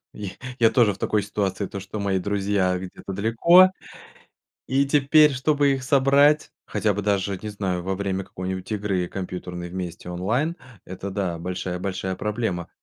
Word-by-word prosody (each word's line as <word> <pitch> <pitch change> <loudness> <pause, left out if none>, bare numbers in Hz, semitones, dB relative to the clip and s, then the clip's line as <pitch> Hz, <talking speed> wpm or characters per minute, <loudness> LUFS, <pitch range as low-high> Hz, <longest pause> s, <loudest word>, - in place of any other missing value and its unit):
я 100 -2 -6 0.3
я 115 -1 +5
тоже 115 -6 +3
в 95 - -16
такой 105 -1 0
ситуации: 100 -1 -2
то, 100 - -6
что 100 +3 -7
мои 100 -1 +1
друзья 95 -1 0
где-то 95 +1 -8
далеко, 140 - +5 1.0
и 135 +2 +2
теперь, 150 +2 +5
чтобы 140 +2 +2
их 135 -1 -2
собрать, 140 +3 +4 0.2
хотя 105 -2 0
бы 105 - -3
даже, 100 -1 0
не 105 - -4
знаю, 95 -4 -2
во 95 +2 -2
время 95 0 -2
какой-нибудь 95 +2 -6
игры 100 -4 -1
компьютерной 90 -2 -6
вместе 90 -2 -6
онлайн- 115 - -1 0.3
это, 95 +2 -6
да, 95 -4 -2
большая-большая 90 +2 -3
проблема. 105 -4 -2
100 Hz, 155 wpm, -24 LUFS, 95-115 Hz, 1.0 s, я